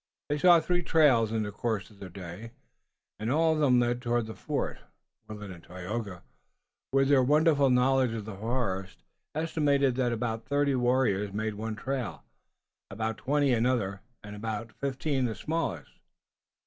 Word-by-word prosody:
They 145 0 0
saw 175 +1 +7
three 175 +2 0
trails 140 -10 +4
in 110 -1 0
the 105 - -4
course 110 -2 -3
of 100 - -19
the 95 - -8
day, 95 +5 -9 0.7
and 110 +3 -2
all 160 +2 +3
of 155 - -1
them 130 -5 +4
led 120 0 0
toward 120 -1 0
the 110 - -7
fort. - - -3 0.5
Willet 105 -2 -8
and 85 -2 -11
Tayoga, 90 +1 -6 0.7
with 135 0 +3
their 140 -2 +6
wonderful 145 +1 +4
knowledge 125 -1 +3
of 110 -3 -5
the 110 -2 -7
forest, 100 -4 -3 0.3
estimated 145 -4 +2
that 125 -2 +1
about 115 0 -3
thirty 145 0 +2
warriors 120 -6 +1
made 110 +1 -2
one 110 +1 -4
trail, 125 -3 -4 0.7
about 110 +2 -3
twenty 140 -1 +2
another, 115 -5 0 0.2
and 105 0 -9 0.4
fifteen 135 0 -1
the 110 -3 -2
smallest. 150 - -3
120 Hz, 155 wpm, -29 LUFS, 105-140 Hz, 0.7 s, saw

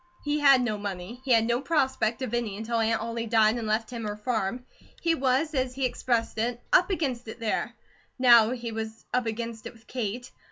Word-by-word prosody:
He 295 0 0
had 275 -3 +6
no 215 -3 -2
money. 200 +4 -6
He 265 - -2
had 225 -1 +5
no 235 +2 0
prospect 265 -6 0
of 240 - -4
any 230 -4 -2
until 230 +2 -2
Aunt 225 0 +1
Ollie 230 +1 -4
died 220 0 +4
and 225 - -4
left 220 +2 -1
him 235 -2 -5
her 210 0 -4
farm. 220 +1 -2 0.3
He 335 -1 +2
was, 275 +2 +1
as 255 -2 -1
he 270 -1 0
expressed 235 -3 -1
it, 240 +1 -1
"up 360 +2 +5
against 265 - -2
it" 220 - -8
there. 225 -2 -2 0.4
Now 235 -4 +7
he 240 -2 -4
was 220 0 -6
"up 250 -2 +1
against 225 0 -4
it" - - -10
with 225 0 -21
Kate. 245 0 -4
235 Hz, 210 wpm, -27 LUFS, 220-255 Hz, 0.4 s, Now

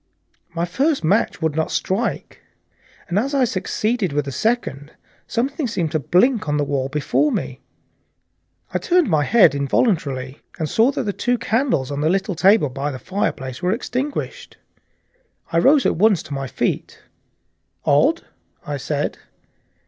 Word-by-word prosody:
My 170 +1 0
first 270 - 0
match 185 0 +1
would 160 -2 0
not 160 0 0
strike, 205 +6 -2 0.7
and 180 +4 +1
as 275 +6 -1
I 270 - +3
succeeded 210 - -1
with 145 0 0
the 140 - -4
second, 155 - -1 0.4
something 270 +4 -1
seemed 175 -9 -2
to 155 - 0
blink 185 - +2
on 150 - +1
the 145 - +1
wall 140 -2 -1
before 150 - +1
me. - - -3 1.1
I - - +1
turned 355 -1 +2
my 155 -6 +2
head 210 - +5
involuntarily 140 - 0 0.2
and 160 - -2
saw 225 - +3
that - - -2
the 205 -3 -2
two 245 +4 0
candles 225 - 0
on 140 0 -3
the 155 - +2
little 195 +2 0
table 190 -2 +4
by 140 +3 -3
the 135 - -5
fireplace 130 -7 -3
were 180 +1 +1
extinguished. 280 - -4 0.9
I 165 - +3
rose 275 - +4
at - - +1
once 205 -1 +3
to 145 - -8
my 135 -1 -3
feet. - - -3 0.8
"Odd," - - +3 0.4
I 145 -1 -3
said. 145 +2 -3
180 Hz, 155 wpm, -21 LUFS, 145-235 Hz, 1.1 s, head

